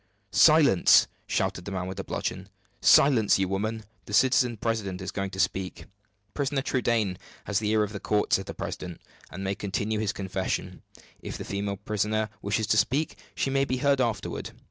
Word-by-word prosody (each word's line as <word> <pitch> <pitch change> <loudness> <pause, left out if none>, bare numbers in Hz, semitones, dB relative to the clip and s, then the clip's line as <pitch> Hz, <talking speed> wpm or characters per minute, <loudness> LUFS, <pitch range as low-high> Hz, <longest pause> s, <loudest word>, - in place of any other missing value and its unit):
"Silence!" 150 - +6 0.2
shouted 90 - -1
the 100 - -5
man 95 -1 -3
with 95 +1 -6
the 95 - -3
bludgeon. - - -4 0.3
"Silence, 125 -7 +5
you 95 -1 0
women! 110 +4 -2 0.2
the 105 - -2
citizen 125 -1 +3
president 105 -4 -2
is 95 - -5
going 95 -1 -3
to 95 - -8
speak." 95 -1 0
"The - - -12 0.5
prisoner 140 -1 -1
Trudaine 115 -8 0 0.3
has 105 - 0
the 105 -1 -1
ear 110 0 +3
of 105 +1 -4
the 100 - -5
court," 105 +1 0
said 95 - +2
the - - -6
president, 90 -2 -6 0.3
"and 95 +2 -7
may 95 0 -1
continue 105 +2 -2
his 105 -2 0
confession. 95 -1 -3 0.4
If - - -6
the - - -7
female 100 0 -3
prisoner 105 +1 -1
wishes 105 +2 0
to - - +1
speak, 140 +10 +1 0.2
she 135 - -1
may 135 0 +2
be 130 -1 -1
heard 140 +1 +2
afterward. 115 -4 -3
105 Hz, 190 wpm, -27 LUFS, 95-120 Hz, 0.5 s, Silence